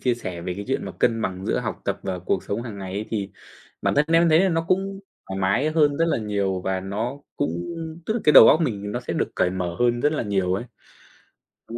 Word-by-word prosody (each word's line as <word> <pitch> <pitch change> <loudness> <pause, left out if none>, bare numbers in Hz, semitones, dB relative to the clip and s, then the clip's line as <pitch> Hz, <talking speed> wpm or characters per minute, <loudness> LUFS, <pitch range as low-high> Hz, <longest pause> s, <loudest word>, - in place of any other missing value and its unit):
chia 125 -2 +1
sẻ 95 -7 -6
về 90 0 -3
cái 100 +2 -6
chuyện 135 - -1
mà - - -6
cân 115 -2 +1
bằng 95 -1 -3
giữa - - +1
học - - -4
tập - - -1
và 95 -2 -3
cuộc 90 +1 -1
sống 110 +4 -3
hàng 110 -4 -7
ngày 95 -1 -6
ấy, 105 +3 -3
thì 100 -3 -2 0.5
bản - - +1
thân 145 - +4
em 165 +1 +5
thấy 160 +1 +5
là 190 - +3
nó 165 -1 0
cũng 195 +1 0 0.3
thoải 95 0 -4
mái 100 +11 +2
hơn 150 -3 +3
rất 165 - +2
là - - +1
nhiều, 100 -3 -1
và 95 0 -2
nó 110 +8 -3 0.2
cũng - - 0 0.6
tức 220 - 0
là 235 - -1
cái 150 - +6
đầu 125 - +10
óc 155 - +5
mình 105 -8 -2
nó 120 - -2
sẽ - - -4
được - - 0
cởi 90 - +2
mở 90 -2 -3
hơn 120 0 +2
rất 150 +4 +2
là 155 - -1
nhiều 95 -4 0
ấy. 100 - -3 1.1
Đúng 115 - -5
110 Hz, 260 wpm, -24 LUFS, 95-145 Hz, 1.1 s, đầu